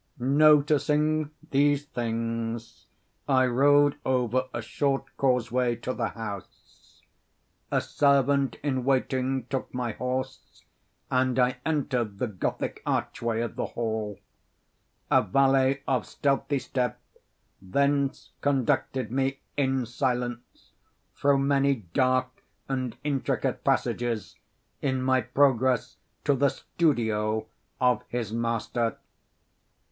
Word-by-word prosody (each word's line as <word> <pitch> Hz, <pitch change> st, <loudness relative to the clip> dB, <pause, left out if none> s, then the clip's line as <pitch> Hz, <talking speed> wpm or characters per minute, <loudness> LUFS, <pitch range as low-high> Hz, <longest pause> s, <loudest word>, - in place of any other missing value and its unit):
Noticing 150 Hz, +2 st, +3 dB, 0.2 s
these 145 Hz, +1 st, +3 dB
things, 115 Hz, -2 st, -4 dB, 0.4 s
I 130 Hz, -2 st, +4 dB
rode 145 Hz, +3 st, +4 dB
over 130 Hz, 0 st, +1 dB
a -, -, -4 dB
short 135 Hz, +4 st, -2 dB
causeway 125 Hz, -2 st, +1 dB
to 120 Hz, +2 st, -4 dB
the 115 Hz, -3 st, -1 dB
house. 100 Hz, -5 st, -10 dB, 0.7 s
A -, -, +1 dB
servant 140 Hz, -1 st, +2 dB
in 130 Hz, -3 st, 0 dB
waiting 130 Hz, -1 st, 0 dB
took 130 Hz, +1 st, -4 dB
my 125 Hz, -2 st, -1 dB
horse, 130 Hz, +3 st, -5 dB, 0.5 s
and 130 Hz, -1 st, +2 dB
I 125 Hz, 0 st, +2 dB
entered 130 Hz, -9 st, -1 dB
the 125 Hz, -, 0 dB
Gothic 105 Hz, -6 st, -3 dB
archway 115 Hz, -1 st, -1 dB
of 120 Hz, -2 st, -4 dB
the -, -, -2 dB
hall. 110 Hz, -3 st, -2 dB, 0.9 s
A -, -, +6 dB
valet, 135 Hz, +4 st, +2 dB
of 130 Hz, -4 st, 0 dB
stealthy 140 Hz, 0 st, 0 dB
step, 125 Hz, -3 st, -2 dB, 0.6 s
thence 140 Hz, +7 st, 0 dB
conducted 130 Hz, -3 st, 0 dB
me, 135 Hz, +1 st, -1 dB
in 135 Hz, -3 st, +1 dB
silence, 120 Hz, 0 st, -3 dB, 0.4 s
through 140 Hz, -1 st, +3 dB
many 140 Hz, 0 st, +2 dB, 0.2 s
dark 130 Hz, 0 st, +1 dB, 0.3 s
and 130 Hz, -3 st, -3 dB
intricate 140 Hz, -3 st, -1 dB
passages 120 Hz, -3 st, 0 dB, 0.5 s
in 130 Hz, -2 st, 0 dB
my 130 Hz, 0 st, +3 dB
progress 130 Hz, 0 st, +2 dB, 0.3 s
to 145 Hz, -, +3 dB
the 140 Hz, +1 st, +3 dB
studio 110 Hz, -11 st, 0 dB, 0.3 s
of 125 Hz, -3 st, +3 dB
his 115 Hz, -3 st, -3 dB
master. 115 Hz, 0 st, -1 dB
130 Hz, 105 wpm, -27 LUFS, 120-140 Hz, 0.9 s, A